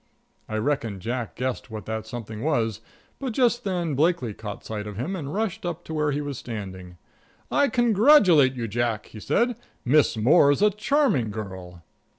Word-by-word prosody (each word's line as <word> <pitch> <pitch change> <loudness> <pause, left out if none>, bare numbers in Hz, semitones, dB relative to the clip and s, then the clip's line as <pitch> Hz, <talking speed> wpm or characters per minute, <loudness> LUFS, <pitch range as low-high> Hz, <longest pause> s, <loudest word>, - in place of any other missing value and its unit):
I 110 - -3
reckon 115 -4 -1
Jack 120 +3 -4
guessed 130 0 -3
what 110 -1 -7
that 110 0 -4
something 110 -2 -7
was, 115 -8 0 0.4
but 265 -4 -3
just 240 -1 +2
then 175 -5 -1
Blakely 145 -5 +1
caught 105 0 -8
sight 105 -1 -5
of 105 -2 -7
him 155 - -3
and 145 -6 -5
rushed 215 +1 -2
up 175 -2 -4
to 160 - -7
where 150 -1 +1
he 145 +1 -1
was 145 -3 -5
standing. 95 -6 -7 0.5
"I 285 - +3
congratulate 215 - +5
you, 120 -2 -3
Jack," 115 0 -1
he 110 - -11
said. 240 - +1 0.3
"Miss 140 -2 +3
Moore's 145 - +4
a 210 - +5
charming 210 - +1
girl." 95 -5 -8
130 Hz, 170 wpm, -25 LUFS, 110-180 Hz, 0.5 s, congratulate